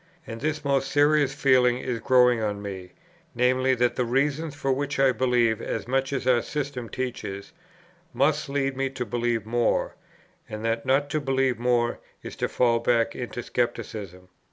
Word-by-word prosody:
And 115 0 -8
this 155 0 -2
most 135 -1 +1
serious 145 -1 +3
feeling 125 -3 +3
is 125 -2 -3
growing 125 0 +4
on 105 -1 -2
me; 95 -3 -7 0.4
viz. 130 +1 +2
that 125 0 +1
the 125 - +2
reasons 140 +5 0
for 135 -2 -1
which 140 +2 -2
I 135 -1 +5
believe 120 -2 +1
as - - -4
much 135 +1 0
as 135 -3 -2
our 125 -2 +4
system 135 -5 -4
teaches, 125 0 -5 0.6
must 140 +4 +1
lead 135 -1 -1
me 135 0 -1
to 130 -2 -5
believe 120 -2 -1
more, 120 +1 0 0.6
and 110 +1 -6
that 115 0 -1
not 140 +2 +2
to 155 - 0
believe 135 -3 0
more 120 -1 +1 0.2
is - - -7
to - - 0
fall 120 -2 +2
back 115 -1 +1
into 120 -1 -5
scepticism. 100 -6 -4
125 Hz, 170 wpm, -25 LUFS, 115-135 Hz, 0.6 s, I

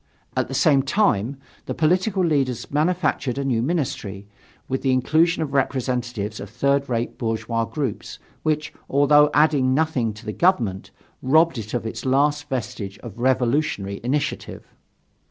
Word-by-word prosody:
At - - 0
the - - -5
same 145 -6 +4
time, 135 - +1 0.3
the - - -3
political 185 +4 +2
leaders 135 -7 0
manufactured 150 -4 0
a 140 - -2
new 120 -4 +1
ministry, 120 - -3 0.4
with 130 0 -2
the 135 - +1
inclusion 160 +7 +2
of 140 -3 -6
representatives 125 -5 -1
of 100 - -7
third 140 +4 0
rate 120 -1 -2
bourgeois 115 0 -1
groups, 135 -5 -4 0.2
which, 155 -1 -1 0.2
although 145 +1 +5
adding 145 -4 +3
nothing 140 -7 +1
to 105 - -13
the 105 - -4
government, 120 - +1 0.3
robbed 155 +1 +3
it 110 +2 -5
of 120 - -2
its 115 +1 -5
last 145 +2 +1
vestige 115 -6 -4
of 115 -2 -9
revolutionary 125 -5 0
initiative. 140 +4 -3
135 Hz, 145 wpm, -23 LUFS, 115-150 Hz, 0.4 s, although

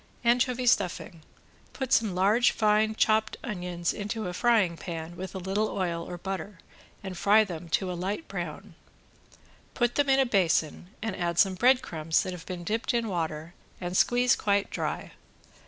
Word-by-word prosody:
~ANCHOVY 250 +1 +2
STUFFING~ 175 -7 0 0.5
Put 265 -1 -2
some 215 -5 +2
large 205 +6 +4
fine 215 0 +2
chopped 220 0 +2
onions 180 -6 -3
into 215 +1 -4
a 180 - -4
frying 210 -4 +2
pan 165 -1 -6
with 185 +1 -7
a - - -2
little 195 +4 -1
oil 170 -3 -2
or 175 - -5
butter 195 +1 -5 0.5
and 190 -1 -6
fry 205 +5 +5
them 175 -4 -7
to 185 +2 0
a - - -3
light 190 - -4
brown. - - -6 1.0
Put 240 -1 +1
them 285 -1 +1
in 270 0 +4
a 270 - +4
basin 175 - +1 0.2
and 220 -4 -2
add 170 -1 -2
some 195 0 +4
breadcrumbs 185 -9 +2
that 185 - -4
have 175 -2 -10
been 180 -2 -5
dipped 225 +7 -1
in 230 -2 0
water 160 -2 -3 0.3
and 175 0 -4
squeeze 245 +4 +4
quite 200 -1 0
dry. - - -3
195 Hz, 170 wpm, -28 LUFS, 175-225 Hz, 1.0 s, fry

